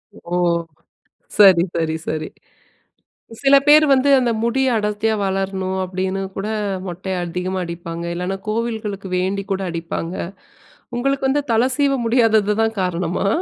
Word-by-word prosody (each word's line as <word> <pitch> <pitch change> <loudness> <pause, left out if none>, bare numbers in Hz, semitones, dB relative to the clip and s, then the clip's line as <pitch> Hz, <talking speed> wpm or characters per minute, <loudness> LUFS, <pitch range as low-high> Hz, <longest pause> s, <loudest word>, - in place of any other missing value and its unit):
ஓ! 175 +1 -6 1.0
சரி, 190 -5 +7
சரி, 160 -1 0
சரி. 155 0 -2 1.2
சில 275 0 +6
பேர் 305 +1 +7
வந்து, 270 +1 +3
அந்த 245 -2 +1
முடிய 265 +3 +1
அடர்த்தியா 210 +1 0
வளர்ணும், 190 -1 -2
அப்பpடின்னு 185 +1 -2 0.2
கூட 195 - -3 0.4
மொட்டைய 185 +2 -4
அதிகமா 180 +2 -3
அடிப்பாங்க. 170 0 -6
இல்லன்னா 180 +2 -3
கோவில்களுக்கு 215 -3 -3
வேண்டி 195 +2 -1
கூட 195 - 0
அடிப்பாங்க. 170 +1 -4 0.8
உங்களுக்கு 275 +2 0
வந்து 290 +2 +2
தல 225 - +4
சீவ 285 -1 +2
முடியாதது 225 -3 +3
தான் 225 -1 0
காரணமா? 180 +1 -1
195 Hz, 125 wpm, -20 LUFS, 180-230 Hz, 1.2 s, சரி